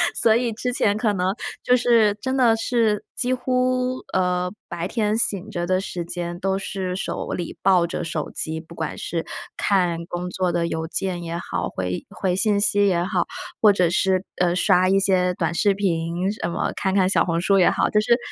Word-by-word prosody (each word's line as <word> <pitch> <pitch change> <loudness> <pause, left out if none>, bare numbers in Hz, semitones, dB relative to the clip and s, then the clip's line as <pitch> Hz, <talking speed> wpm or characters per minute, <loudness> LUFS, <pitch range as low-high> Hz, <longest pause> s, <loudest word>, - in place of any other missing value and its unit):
所 220 -1 +4
以 240 -1 +1
之 245 +3 -3
前 205 -3 +1
可 215 -2 +1
能 185 0 0 0.3
就 250 0 +4
是 230 -4 +4
真 260 0 -1
的 235 -4 +4
是 225 -3 +1
几 255 +1 0
乎， 255 0 0
呃， 180 -1 0 0.2
白 170 0 -4
天 215 +1 0
醒 205 -2 -1
着 175 -3 -3
的 185 +1 +1
时 180 -3 -4
间 175 0 -5
都 195 0 0
是 190 -1 -4
手 - - -4
里 175 -2 -4
抱 180 -3 +4
着 175 - -4
手 160 -2 -3
机。 160 0 -2
不 165 +1 -13
管 160 -2 -4
是 165 -1 -3 0.3
看 180 -4 +1
工 180 +1 -4
作 180 -1 -1
的 170 -1 0
邮 160 -1 -3
件 180 0 -3
也 170 0 -4
好， - - -3
回 90 -1 -4
回 185 -2 -1
信 205 0 +2
息 205 0 +3
也 175 -3 +2
好， 180 -1 0 0.4
或 210 -2 +7
者 180 -4 +2
是， 190 +1 +1
呃， 175 -1 +2
刷 185 0 +3
一 195 0 +4
些 185 -2 +2
短 170 -1 -1
视 200 +3 +3
频 175 0 -1
什 175 -5 -4
么， - - -1
看 190 0 -1
看 185 -2 +4
小 195 - +3
红 170 -1 0
书 195 +2 +3
也 180 - +6
好， - - +1
就 210 - +4
是 235 +2 +3
190 Hz, 220 characters per minute, -23 LUFS, 175-210 Hz, 0.4 s, 或